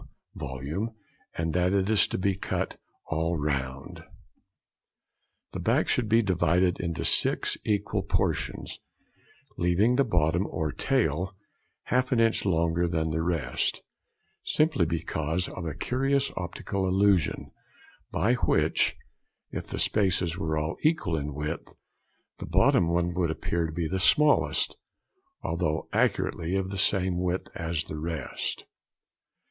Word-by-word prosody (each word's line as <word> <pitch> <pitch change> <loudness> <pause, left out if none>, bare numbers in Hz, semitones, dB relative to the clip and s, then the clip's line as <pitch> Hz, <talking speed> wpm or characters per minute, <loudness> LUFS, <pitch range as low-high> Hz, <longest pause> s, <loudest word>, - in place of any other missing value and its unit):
volume, 75 - -4 0.4
and 80 -1 -1
that 90 +1 +2
it 95 -1 +2
is 110 -1 +4
to - - -3
be 100 +1 +1
cut 95 - -3 0.3
all 80 +2 -1
round. 70 -3 -3 1.5
The - - -5
back - - +2
should 120 -4 +1
be 115 +1 +4
divided 90 -1 +2
into 85 -2 -2
six - - +4
equal 105 -2 0
portions, - - -2 0.8
leaving 95 +8 +3
the 140 - +5
bottom, 90 - +1
or 80 -2 -2
tail, 95 - 0 0.5
half 125 0 0
an 125 - +3
inch 115 -2 +2
longer 85 -1 +1
than 80 -2 -1
the 80 +1 0
rest, 85 -2 -1 0.6
simply 155 - +2
because 80 +1 -1
of 85 -3 -6
a 75 - -4
curious 135 +2 0
optical 95 +2 -3
illusion, 95 -4 +2 0.6
by 105 +10 +1
which, 125 - +2 0.6
|21| - - -2
if - - -10
the - - -5
spaces 90 -5 +1
were 80 -4 -2
all 75 +2 -2
equal 155 - +1
in 75 -2 -3
width, 75 +3 -4 0.7
the - - -6
bottom 85 - +4
one 85 +1 +1
would 85 -2 0
appear 85 +1 -1
to - - -6
be 85 0 -2
the 95 +3 -2
smallest, 150 +10 +3 0.7
although 80 -2 -1
accurately 85 +4 0
of 95 0 -1
the 100 - -4
same 90 -2 +2
width 90 0 -2
as 80 -1 -2
the 75 - -7
rest. 80 0 -4
85 Hz, 135 wpm, -27 LUFS, 80-100 Hz, 1.5 s, the